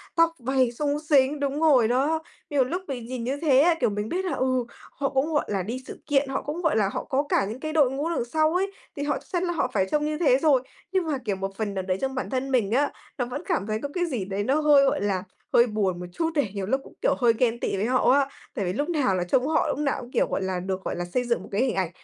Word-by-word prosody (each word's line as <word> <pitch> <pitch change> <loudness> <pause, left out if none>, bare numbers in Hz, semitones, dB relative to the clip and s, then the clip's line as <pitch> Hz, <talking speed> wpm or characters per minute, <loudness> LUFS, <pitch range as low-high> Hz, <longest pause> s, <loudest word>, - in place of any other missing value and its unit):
tóc 330 0 +4
váy 255 0 +1
xúng 290 +4 -1
xính 290 -2 +3
đúng 280 +1 -1
rồi 275 -8 +5
đó, 275 +7 +1 0.3
nhiều 285 -3 +3
lúc 345 +9 -3
mình 250 -5 -5
nhìn 245 0 -5
như 260 +4 -2
thế 280 -5 +4
á, 335 +4 +5
kiểu, - - +2
mình 210 +1 -3
biết 375 +2 -1
là, 365 - -1
ừ, 255 -1 0 0.3
họ 275 0 -2
cũng, 285 +4 0
gọi 295 - +2
là, 195 -3 -1
đi 245 +7 -5
sự - - -8
kiện, 275 -2 +2
họ 270 - -1
cũng, 305 +4 -4
gọi 320 -8 +2
là, 200 -3 +2
họ - - -3
có 270 +2 0
cả - - +2
những 220 +5 -6
cái 310 +2 -4
đội 290 -5 +4
ngũ 285 +5 -2
đằng 330 -8 -1
sau 310 +5 +1
ấy, 390 +2 +1 0.2
thì 285 - -3
họ 290 0 0
chắc - - -21
chắn 350 0 +1
là 350 -1 0
họ 315 - 0
phải 190 -3 +2
trông 300 0 +1
như 305 0 -1
thế 280 -6 +4
rồi, 280 -4 +4 0.3
nhưng 375 -2 +1
mà, 295 -3 0
kiểu, 205 -3 0
một 195 +1 -4
phần 215 -2 -2
nào 190 - -2
đấy 185 0 +1
trong 265 0 -2
bản 260 - -3
thân 265 0 -2
mình 230 -6 +2
á, 280 +5 +2 0.3
nó 250 - 0
vẫn 250 +5 -5
cảm 340 - -1
thấy 215 0 -1
có 285 - -2
cái 355 -1 0
gì 250 - -3
đấy 195 +1 -2
nó 275 +7 +2
hơi, 290 -2 +6
gọi 270 - +1
là, 195 -3 0 0.3
hơi 235 - +6
buồn 200 -5 -1
một 180 - -5
chút 325 - 0
này, 280 -10 +1
nhiều 195 -1 -2
lúc 265 +7 0
cũng, - - -15
kiểu, - - +2
hơi 240 -3 +4
ghen 235 -1 +1
tị - - -1
với 200 - 0
họ 255 +2 +3
á, 275 0 +3 0.3
tại 200 - -1
vì 180 - -1
lúc 290 - -2
nào 285 - +1
là 180 - 0
trông 250 +9 +1
họ 320 +1 +2
lúc - - -1
nào 285 -3 -1
cũng, 245 0 -11
kiểu, - - +2
gọi - - -2
là, 190 -1 -1
được, 190 +1 -4
gọi - - -3
là, 175 - -3
xây 245 +8 -1
dựng 240 -1 -1
một - - -12
cái 200 - +1
hình 260 -1 +1
ảnh, 185 -3 0
260 Hz, 305 wpm, -25 LUFS, 220-295 Hz, 0.3 s, hơi